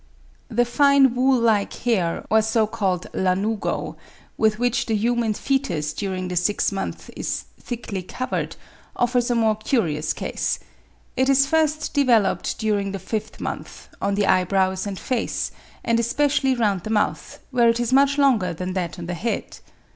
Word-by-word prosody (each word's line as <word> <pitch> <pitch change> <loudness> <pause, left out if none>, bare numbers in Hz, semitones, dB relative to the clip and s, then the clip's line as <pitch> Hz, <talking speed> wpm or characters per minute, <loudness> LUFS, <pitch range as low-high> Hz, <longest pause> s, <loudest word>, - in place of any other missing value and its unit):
The 240 +2 +2
fine 275 +1 +4
wool 255 +1 +3
like 220 -3 +2
hair, 190 -9 -1
or 220 0 +5
so 220 0 +2
called 195 -5 -1
lanugo, 195 +4 -1 0.4
with 215 -1 +2
which 245 +1 0
the 225 - +1
human 230 0 +1
foetus 205 - -1
during 185 -2 -3
the 180 - -4
sixth 190 +5 +1
month 195 -1 -5
is - - -3 0.2
thickly 225 -5 -5
covered, 255 +8 -4 0.4
offers 245 0 +1
a 240 - +2
more 220 -2 +3
curious 175 - 0
case. - - -2 0.6
It 260 +1 +2
is 275 0 +5
first 310 0 0
developed, 245 -7 +2
during 205 -2 -1
the - - -2
fifth 215 +3 -5
month, - - -6
on 200 - 0
the 205 0 +2
eyebrows 190 +1 +2
and 195 -1 -4
face, 250 +3 -2 0.3
and 230 0 +2
especially 270 +2 +1
round 205 -6 +1
the 215 - -7
mouth, 215 -1 -1
where 240 -2 +4
it 230 +1 +1
is 240 +1 -1
much 280 +1 +4
longer 230 -11 +3
than 185 +2 -4
that 180 -1 -3
on 175 - -6
the 175 - -4
head. 205 +8 -3
220 Hz, 160 wpm, -23 LUFS, 190-245 Hz, 0.6 s, or